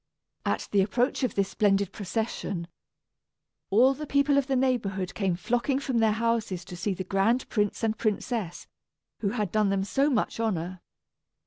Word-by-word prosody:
At - - -1
the 200 - +4
approach 240 +9 +1
of 255 - 0
this 200 -1 +1
splendid 200 -2 +2
procession, 200 -3 -3 1.0
all 245 +7 +5
the 300 +2 -7
people 280 +1 +3
of 280 -1 +2
the 270 - +1
neighborhood 210 -8 0
came 190 -4 0
flocking 245 +7 0
from 265 -3 -1
their 220 -1 +4
houses 220 -5 -1
to 180 - -8
see 190 +2 -2
the 185 - -4
grand 200 +7 +1
prince 210 0 0
and 220 -1 +1
princess, 215 -3 -2 0.5
who 200 - 0
had 210 -4 -2
done 215 -2 +2
them 195 -1 +1
so 270 +9 +2
much 235 -4 0
honor. 185 -5 -2
215 Hz, 165 wpm, -27 LUFS, 195-245 Hz, 1.0 s, all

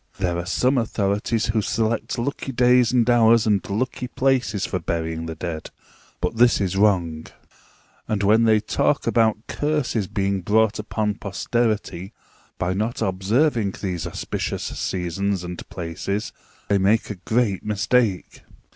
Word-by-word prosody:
There 90 -2 -1
are 85 - -5
some 125 +7 +2
authorities 105 0 0
who 110 - +1
select 110 +3 -1
lucky 135 +2 -3
days 125 -1 +4
and 125 -2 +3
hours 115 -2 +5
and 105 -3 +2
lucky 125 +4 -2
places 125 -6 0
for 90 - -2
burying 80 0 -3
the 80 - -5
dead, 80 -1 -5 0.5
but 90 +5 -2
this 120 +1 +5
is 95 -2 -1
wrong; 90 -6 +1 0.8
and 105 -2 -1
when 110 +3 +4
they 110 -1 +5
talk 105 - 0
about 110 -1 +2
curses 145 -9 -1
being 100 0 -1
brought 110 +3 +2
upon 105 -1 -2
posterity 105 -2 -2 0.4
by 90 +1 -1
not 110 +5 -2
observing 105 +3 +1
these 90 -5 -3
auspicious - - -4
seasons 95 +2 -2
and 90 0 -7
places, 90 +4 -4 0.3
they 100 -1 +2
make 105 +3 +2
a - - -4
great 110 +1 0
mistake. 105 -1 0
105 Hz, 140 wpm, -23 LUFS, 95-115 Hz, 0.8 s, hours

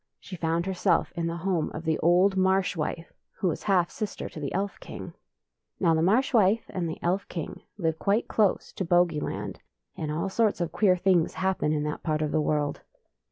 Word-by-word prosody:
She 190 - -9
found 165 0 0
herself 190 -2 +1
in 170 -1 -1
the 165 0 -3
home 180 -5 +1
of 160 - -5
the 160 -1 +1
old 180 +4 +4
Marsh 190 0 +2
wife,, 165 +1 -4 0.2
who 185 - +1
is - - -5
half 185 -4 +2
sister 215 -2 -4
to - - -9
the 145 -2 -3
Elf 195 +2 -2
king. - - -8 0.7
Now 170 -3 +3
the 160 - +2
Marsh 225 +11 +3
wife 215 0 +4
and 175 -3 -2
the 160 - -5
Elf 185 +3 0
king 165 -4 -6 0.2
live 160 -4 -1
quite 205 +3 +1
close 210 -4 +1
to - - -1
Bogey 175 -2 +3
land, - - -4 0.4
and 155 -2 -3
all 160 +5 -1
sorts 210 +1 +1
of 170 -2 -1
queer 185 -1 +3
things 180 -3 +2
happen 190 -5 0
in 150 -1 0
that 150 0 -3
part 155 -1 0
of 150 - -1
the 155 - +2
world. 150 -1 -1
175 Hz, 205 wpm, -27 LUFS, 160-195 Hz, 0.7 s, old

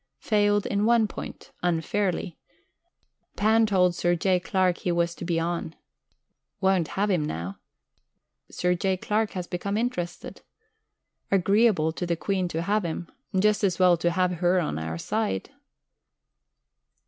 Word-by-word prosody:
Failed 205 +4 +2
in 200 +1 0
one 235 -2 +4
point. - - -9
Unfairly. 180 +1 -1 1.0
Pan 220 +2 +3
told 180 -3 +3
Sir 175 0 +1
J. 185 +1 +2
Clark 180 0 +1
he 180 - -1
was 170 0 +1
to - - -9
be 170 -1 0
on. 165 -1 -3 0.8
Won't 190 -4 +2
have 205 +1 +2
him 175 -5 +1
now. 90 - -5 0.9
Sir 180 0 0
J. 185 +1 0
Clark 215 +3 -1
has 180 -2 -4
become 200 +4 -3
interested. 200 -8 -4 0.9
Agreeable 195 -3 +3
to 175 +2 -4
the 170 - +1
Queen 190 0 -1
to 165 -1 -3
have 205 +3 +1
him 170 0 -5 0.3
just 210 +2 +2
as 185 -4 +2
well 180 -1 +5
to 170 +1 +1
have 180 +1 +1
Her 180 +1 +3
on 155 - -2
our 80 +1 -4
side.... 215 - -2
180 Hz, 145 wpm, -26 LUFS, 170-205 Hz, 1.0 s, well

